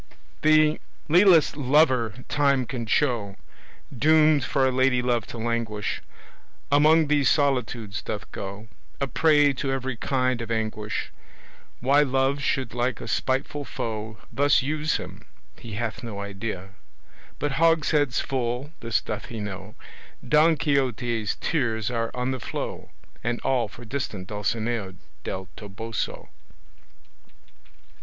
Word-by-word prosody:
The 155 0 +4 0.3
lealest 175 -3 +6
lover 130 -5 +2
time 140 -3 +2
can 120 -2 -5
show, 115 -8 +1 0.6
Doomed 155 +2 +4
for 135 +1 +1
a - - +2
lady 130 0 +3
love 120 -3 0
to - - -8
languish, 115 -2 -2 0.7
Among 155 +3 +5
these 145 -2 +3
solitudes 125 -8 0
doth 110 +1 -6
go, 100 +3 -7 0.3
A 140 - +1
prey 145 +2 +4
to 135 +1 -2
every 130 -1 -2
kind 130 0 0
of 115 - -6
anguish. 110 -1 -2 0.7
Why 140 +3 +4
Love 135 0 +1
should 130 -3 -1
like 120 -1 -1
a - - -7
spiteful 135 +2 -1
foe 110 -4 -5 0.2
Thus 145 -1 +3
use 150 +2 0
him, - - -9 0.4
he 115 -3 -9
hath 110 +1 -3
no 115 -5 -6
idea, 100 -1 -5 0.7
But 145 0 -1
hogsheads 155 -5 +3
full 130 +2 -2
this 115 -2 0
doth 105 - -5
he 115 - -7
know 105 0 -6 0.5
Don 155 +1 +5
Quixote's 125 -6 0
tears 120 -7 0
are 115 -1 -1
on 125 +1 -1
the 130 - -3
flow, - - -5 0.3
And 120 +1 -1
all 125 -4 +1
for 120 +4 -12
distant 110 -6 -4
Dulcinea 110 -1 -2 0.3
Del 95 0 -5
Toboso. 110 +1 -5
125 Hz, 130 wpm, -25 LUFS, 110-145 Hz, 0.7 s, lealest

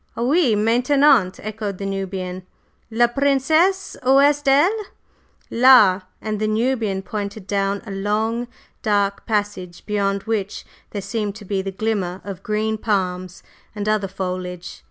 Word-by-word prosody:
"Oui, 255 0 +2
maintenant," 235 -1 +3
echoed 210 -2 -4
the 195 - -5
Nubian. 190 -1 -4 0.5
"La 235 +1 +3
Princesse, 285 +9 +1
où 265 +2 +4
est 290 0 +3
elle?" 380 +10 +3 0.7
"Là!" 230 -6 +6 0.2
and 215 -1 -4
the 215 - 0
Nubian 220 -3 0
pointed 205 0 -5
down 200 0 -1
a 210 - -7
long, 215 +4 -1 0.3
dark 200 -2 0
passage 205 -5 -3
beyond 200 -2 -1
which 215 -3 -3 0.2
there 200 -2 -5
seemed 205 0 -3
to 210 -1 -11
be 195 0 -1
the 195 - -4
glimmer 190 -3 -2
of 195 -2 -7
green 215 +1 -1
palms 185 -4 -2 0.3
and 205 0 -4
other 215 -2 +1
foliage. 180 -1 -5
210 Hz, 135 wpm, -21 LUFS, 195-235 Hz, 0.7 s, Là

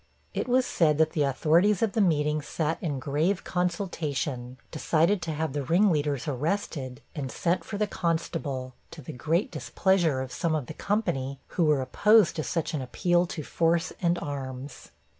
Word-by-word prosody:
It - - -2
was 255 +1 +3
said 155 -9 +2
the 160 0 +2
authorities 165 - +3
of 220 - +2
the 220 - +1
meeting 150 -4 +2
sat 160 +2 -2
in 150 -6 -2
grave 155 +8 0
consultation, 155 -8 -2
decided 165 +5 +2
to 165 - -3
have 155 -2 -2
the 145 - -1
ring 180 +8 +3
leaders 145 -4 -1
arrested, 145 -2 -2
and 140 -6 -4
sent 170 +7 0
for 205 - -5
the 210 - +2
constable, 160 -8 -2 0.2
to 155 - -11
the - - -7
great 165 +8 0
displeasure 175 -8 +1
of 130 -1 -4
some 165 +1 0
of 150 -5 -2
the - - -7
company, 140 -11 -1
who 170 - +1
were 150 -3 +3
opposed 210 - +4
to 155 - -1
such 165 +1 -2
an 150 - -1
appeal 175 +7 +1
to 160 -2 -5
force 165 +3 +1
and 175 -1 +2
arms. 135 -2 -6
160 Hz, 175 wpm, -27 LUFS, 140-175 Hz, 0.2 s, opposed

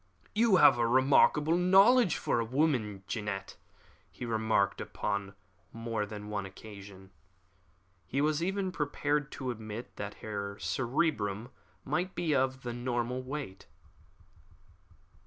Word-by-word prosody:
"You 220 -2 +4
have 150 - +7
a 115 - +3
remarkable 135 +5 +4
range 175 - +2
of - - +1
knowledge 200 0 +6
for - - 0
a - - +1
woman, 115 -6 0
Jeannette," 100 -3 -4 0.5
he - - -8
remarked 110 -3 +1
upon 100 -1 -3 0.4
more 115 -2 -3
than 105 0 -8
one 105 -1 -3
occasion. 95 -1 -12 1.0
He 135 - -1
was 150 +1 +1
even 190 +1 -1
prepared 145 -2 -1
to 130 -2 -3
admit 110 0 -7
that 100 0 -5
her 100 -2 -5
cerebrum 120 - -1 0.4
might 175 +7 -1
be 165 -3 0
of 130 -1 0
the 120 -1 -4
normal 120 +1 -2
weight. 130 -7 -7
120 Hz, 130 wpm, -31 LUFS, 105-150 Hz, 1.0 s, have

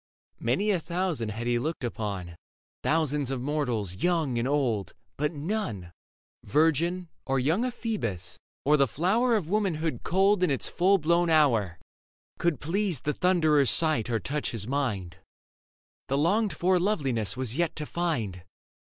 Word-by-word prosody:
Many 195 - +1
a 185 - +1
thousand 170 - -2
had 110 +3 -5
he 120 0 +1
looked 155 +2 -3
upon, 100 -7 -4 0.5
Thousands 150 -3 +1
of 135 -1 -2
mortals, 125 - -2
young 160 - +1
and 120 - 0
old; 125 - 0 0.2
but 150 +1 0
none 145 - -3 0.3
— - - -71
Virgin, 165 +4 +1 0.2
or 135 0 +1
young 160 - +1
ephebus, 195 - -3 0.3
or 150 +2 +5
the 140 -1 +4
flower 215 - +2
Of 195 -8 -1
womanhood 170 -5 0
culled 195 +2 +3
in 180 - +3
its 135 - 0
full 190 +3 +3
blown 170 +1 +2
hour 115 - +3 0.3
— - - -45
Could 170 -6 +1
please 180 - -1
the 150 - -1
Thunderer's 155 -7 +3
sight 155 -9 +1
or 115 -2 +1
touch 145 +7 -3
his 110 -4 -3
mind; 105 -10 -2 0.9
The 135 - 0
longed 200 +8 +2
for 180 +1 +2
loveliness 135 - -1
was 130 0 -2
yet 170 -2 +1
to 150 - -4
find. 120 - -2
150 Hz, 155 wpm, -27 LUFS, 120-175 Hz, 0.9 s, or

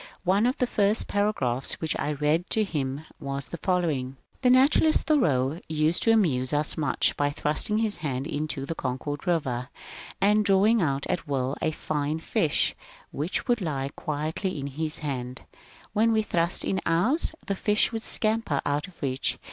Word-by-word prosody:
One 195 +5 +3
of 255 - -1
the 250 - +2
first 210 -2 +1
paragraphs 170 - 0
which 160 - -1
I 150 - -1
read 150 +4 0
to 220 - +2
him 145 -5 -3
was 140 0 -5
the 170 - -6
following: 150 -8 -1
— - - -36
The 255 - +4
naturalist 275 +5 +4
Thoreau 150 - +2
used 155 +2 +1
to 225 - +4
amuse 145 - +2
us 150 +1 +3
much 155 -3 +1
by 145 0 +1
thrust 150 +4 0
ing 210 - +1
his 220 -2 0
hand 135 -3 -3
into 150 -2 -3
the 165 - -3
Concord 145 +3 -4
River, 130 -7 -1 0.5
and 210 +2 +3
drawing 205 +3 +4
out 140 -4 0
at 180 -3 -3
will 135 -1 -1
a - - +1
fine 150 -1 -2
fish, 160 -1 +1 0.4
which 155 +7 -2
would 240 -3 +1
lie 140 -5 -2
quietly 155 +4 -3
in 135 - -4
his 155 +3 -3
hand; 125 -2 -4 0.5
when 225 +2 +3
we 220 -1 +2
thrust 170 -3 +1
in 190 - -1
ours, 230 - +1
the 200 - -1
fish 210 +3 +2
would 225 -1 -4
scamper 215 -10 +2
out 145 +5 -1
of 185 - -18
reach. 130 -1 -1
160 Hz, 180 wpm, -26 LUFS, 140-205 Hz, 0.5 s, The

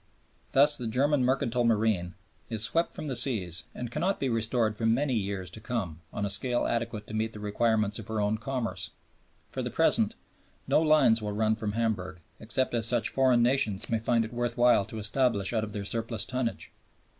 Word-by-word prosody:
Thus 145 +2 +5
the 120 - -3
German 135 +4 +2
mercantile 125 -2 +1
marine 110 -6 +1 0.3
is 110 -2 0
swept 165 +9 +1
from - - -6
the 135 -4 -3
seas 110 - -1
and 120 -1 -5
cannot 175 +8 -1
be 135 - 0
restored 115 -1 0
for 115 +1 -1
many 130 +4 +2
years 100 -5 -3
to 110 - -6
come 100 -10 -4
on 100 - -3
a - - -2
scale 120 +5 +2
adequate 115 -2 -2
to - - -10
meet 110 +1 -1
the 105 - -9
requirements 105 0 +1
of 110 - -9
her 110 -2 -2
own 105 +1 0
commerce. 115 -7 -3 0.6
For - - -3
the - - -3
present, - - +2 0.5
no - - +4
lines 145 -8 +4
will 105 -1 -3
run 110 +1 +1
from 110 -2 -3
Hamburg, 105 -6 -2 0.2
except 120 +4 -1
such 120 +1 +2
as - - -16
foreign 130 -3 +4
nations 115 -5 +1
may 115 - +2
find 115 0 +1
it 110 - -9
worth 120 0 -2
while 120 -4 +4
to 110 - -8
establish 105 -1 0
out 110 -2 +1
of 110 - -5
their 100 -1 -5
surplus 115 -1 -2
tonnage. 125 -2 -3
115 Hz, 200 wpm, -28 LUFS, 105-125 Hz, 0.6 s, Thus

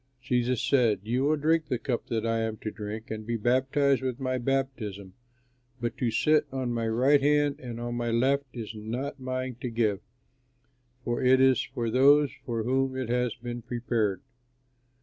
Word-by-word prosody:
Jesus 125 -1 0
said, 125 -7 +3
"You 125 +5 0
will 155 +2 +3
drink 160 +1 +1
the 125 - 0
cup 120 0 -3
that 115 -1 -2
I 115 0 +1
am 110 -1 -2
to 110 - -3
drink 110 +2 -7
and 110 0 -4
be 115 +1 -2
baptized 130 +4 +2
with 130 -1 -3
my 130 -1 -1
baptism, 120 -7 -2 0.7
but 120 -1 -3
to 120 - 0
sit 150 +6 +2
on 130 -2 -2
my 115 -1 -1
right 130 +6 +3
hand 145 0 +2
and 120 -2 -7
on 120 0 -4
my 120 0 -2
left 135 +5 +2
is 115 -3 -6
not 120 +7 -5
mine 130 -1 -4
to 125 - -2
give; 110 -4 0 1.0
for 120 -1 -1
it 130 +1 +5
is 130 -1 +5
for 115 -2 -3
those 140 +3 +5 0.2
for 115 -2 -1
whom 130 +2 0
it 130 -3 -3
has 125 -1 0
been 120 0 -6
prepared." 115 -5 -1
125 Hz, 180 wpm, -28 LUFS, 115-135 Hz, 1.0 s, it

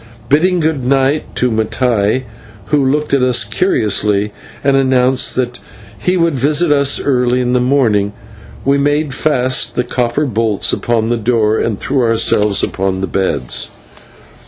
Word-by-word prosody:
Bidding 175 +5 +2
good 155 -4 -1
night 135 +3 0
to 125 -1 0
Mattai, 110 +1 0 0.5
who 150 -2 +2
looked 150 +3 -1
at 140 - +3
us 125 -1 +2
curiously 105 - 0 0.3
and 140 0 +2
announced 130 -1 +1
that 125 -1 -2 0.4
he 180 - 0
would 170 -2 +1
visit 150 +5 +1
us 140 -1 +2
early 125 -2 +1
in 125 0 0
the 125 - +3
morning, 115 -6 +1 0.5
we 140 +1 +2
made 145 0 0
fast 130 -3 0
the 125 - 0
copper 125 +3 -1
bolts 110 -4 -1
upon 115 -1 -1
the 120 - 0
door 110 -1 +1
and 110 -4 -2
threw 135 -2 -1
ourselves 105 -3 +2
upon 95 0 -2
the - - 0
beds. 95 -11 -1
125 Hz, 150 wpm, -14 LUFS, 110-140 Hz, 0.5 s, at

